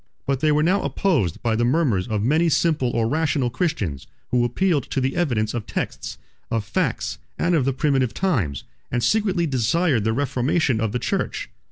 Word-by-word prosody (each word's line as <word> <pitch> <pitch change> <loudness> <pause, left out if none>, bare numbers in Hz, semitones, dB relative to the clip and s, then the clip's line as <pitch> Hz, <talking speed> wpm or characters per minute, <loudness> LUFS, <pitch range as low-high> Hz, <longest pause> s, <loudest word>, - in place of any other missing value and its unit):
But 135 -1 0
they 155 +2 +2
were 150 0 +3
now 185 +5 +2
opposed 135 - 0
by 115 -2 +1
the 115 - +1
murmurs 120 - +1
of 105 -3 -1
many 155 +7 +3
simple 155 -5 +2
or 115 -1 0
rational 145 -2 0
Christians, 115 - -2 0.2
who 125 -1 +3
appealed 145 +3 0
to - - -1
the 130 +1 -1
evidence 115 -11 0
of 115 -3 -4
texts, - - -4 0.3
of 115 -2 -1
facts, - - -1 0.2
and 175 - +1
of 150 -6 +2
the 135 - +2
primitive 135 -3 +1
times, 105 - -1 0.3
and 120 -1 0
secretly 195 -5 +2
desired 135 - +1
the 110 - +1
reformation 130 -1 +1
of 110 -2 0
the 125 - -1
church. - - -2
130 Hz, 185 wpm, -23 LUFS, 115-160 Hz, 0.3 s, were